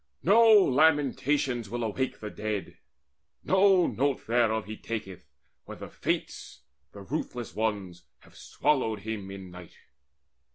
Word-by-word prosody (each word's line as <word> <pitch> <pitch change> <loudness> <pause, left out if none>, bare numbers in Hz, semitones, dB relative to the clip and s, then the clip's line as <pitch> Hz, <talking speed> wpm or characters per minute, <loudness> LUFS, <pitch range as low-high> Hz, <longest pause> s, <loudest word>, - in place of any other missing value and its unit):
No 225 +5 +6
lamentations 140 - +3
will 120 +2 -3
awake 125 +4 -3
the 105 -1 -6
dead; 105 -3 -5 0.6
No 190 -2 +4
note 140 0 -1
thereof 110 -2 +1
he 110 +2 -7
taketh, 95 -9 -7 0.4
when - - -9
the - - -9
Fates, - - -4 0.3
The 100 - -11
ruthless 120 +1 -5
ones, 100 -5 -3 0.2
have - - -21
swallowed 110 -8 -1
him 105 -2 -5
in 95 -2 -9
night." 90 -1 -13
115 Hz, 125 wpm, -28 LUFS, 100-145 Hz, 0.6 s, No